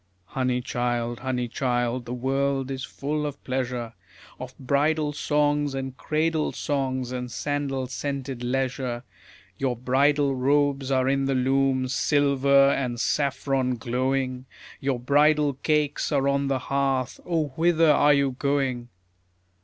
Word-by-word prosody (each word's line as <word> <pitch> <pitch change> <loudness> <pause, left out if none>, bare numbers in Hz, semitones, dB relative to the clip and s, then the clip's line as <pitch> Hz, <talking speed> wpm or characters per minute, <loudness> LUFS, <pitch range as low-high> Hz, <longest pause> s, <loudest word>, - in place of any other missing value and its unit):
Honey, 125 +4 -1
child, 120 -1 -2
honey, 125 -1 -2
child, 120 0 -1
the 120 - -4
world 135 +1 -1
is 135 -1 -4
full 150 +2 -3
of 145 -2 -5
pleasure, 125 -3 -3 0.5
Of 130 0 -8
bridal 150 +3 +1
songs 145 -1 +1
and 135 -1 -4
cradle 155 +2 0
songs 130 -3 -2
and 125 -1 -4
sandal 140 -1 -2
scented 135 -1 -4
leisure. 130 -1 -2 0.6
Your 130 -2 0
bridal 140 +3 +2
robes 140 +1 +1
are 130 -1 +2
in 135 0 +1
the 135 0 0
loom, 130 0 +2
silver 140 0 +3
and 125 -4 -2
saffron 135 -2 0
glowing, 130 +2 -2 0.3
Your 135 -2 -1
bridal 145 +3 +3
cakes 150 +2 0
are 140 -2 +2
on 140 0 +1
the 135 -1 +1
hearth: 135 -1 -1
O 160 -4 -1
whither 165 +2 +3
are 145 0 +5
you 140 -1 +2
going? 135 -4 -1
135 Hz, 130 wpm, -25 LUFS, 130-145 Hz, 0.6 s, are